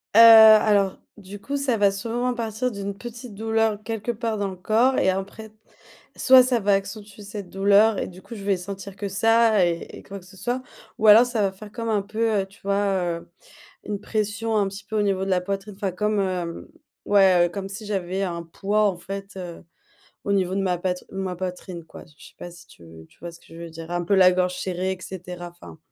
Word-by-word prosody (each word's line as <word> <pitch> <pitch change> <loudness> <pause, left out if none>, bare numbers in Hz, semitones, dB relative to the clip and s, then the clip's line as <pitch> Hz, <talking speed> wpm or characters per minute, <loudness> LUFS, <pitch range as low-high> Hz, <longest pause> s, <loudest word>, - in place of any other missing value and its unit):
Heu, - - +8
alors. 215 -3 +7 0.2
Du 205 0 -10
coup, 280 +8 -4
ça 275 -4 0
va 200 -1 +3
sûrement 235 +5 -2
partir 235 +1 -3
d'une 200 -1 -6
petite 240 -1 -9
douleur 225 0 0
quelque 225 +1 -3
part 225 -1 -3
dans 200 - -1
le 190 - -6
corps 225 +8 +2
et - - +3
après 195 +3 -4
t 215 - -30 0.6
soit 260 0 +7
ça 250 -2 +1
va 205 0 +2
accentuer 200 +1 -4
cette 205 -2 -8
douleur 200 +3 +3
et - - -3
du 185 +1 -12
coup, - - -11
je 200 - -9
vais 200 -1 +1
sentir 195 +1 -8
que 200 0 -5
ça 225 0 +3
et 170 -1 -1 0.2
et - - -13
quoi 200 0 -9
que 180 - -18
ce 190 +1 -16
soit, 245 +4 -2 0.4
ou 220 - +2
alors 215 +3 +9
ça 240 -3 -2
va 195 -1 +1
faire 205 +2 -12
comme 230 0 -5
un 210 -2 +1
peu, 215 +1 0
heu, - - -4
tu 200 +4 -22
vois, 200 0 0 0.4
heu, 170 - -14 0.6
une 205 -1 -4
pression 220 +1 -2
un 205 - +2
petit 195 +1 -9
peu 215 +1 -3
au - - +2
niveau 195 -2 0
de 195 - -4
la 185 -1 +2
poitrine, 195 +2 -5
enfin 195 -1 -3
comme, 210 +3 0
heu, 180 -3 -4 0.3
ouais, 190 -4 +5
heu, - - -3
comme 195 +1 -6
si 200 +2 -8
j'avais 190 -2 -2
un 170 -2 -4
poids, 200 +5 -1
en 180 - -7
fait, 195 +2 -8
heu, 175 -3 -8 0.6
au 200 - -1
niveau 190 -2 +1
de 195 - 0
ma 185 -2 0
pat 180 0 -3
ma 190 -2 -4
poitrine 180 -1 -6
quoi. - - -13
Je 150 - -22
je - - -14
sais - - -24
pas 175 - -8
si 170 0 -15
tu 85 - -17 0.2
tu - - -27
vois 170 0 -7
ce 165 - -16
que - - -23
je - - -14
veux 170 - -8
dire. 165 +1 -10
Un 175 0 -2
peu 200 - +1
la 185 -1 +6
gorge 180 0 0
serrée 185 0 -2
et 190 - -7
cetera 180 -1 -8
enfin. 175 -2 -14
200 Hz, 240 wpm, -23 LUFS, 185-220 Hz, 0.6 s, alors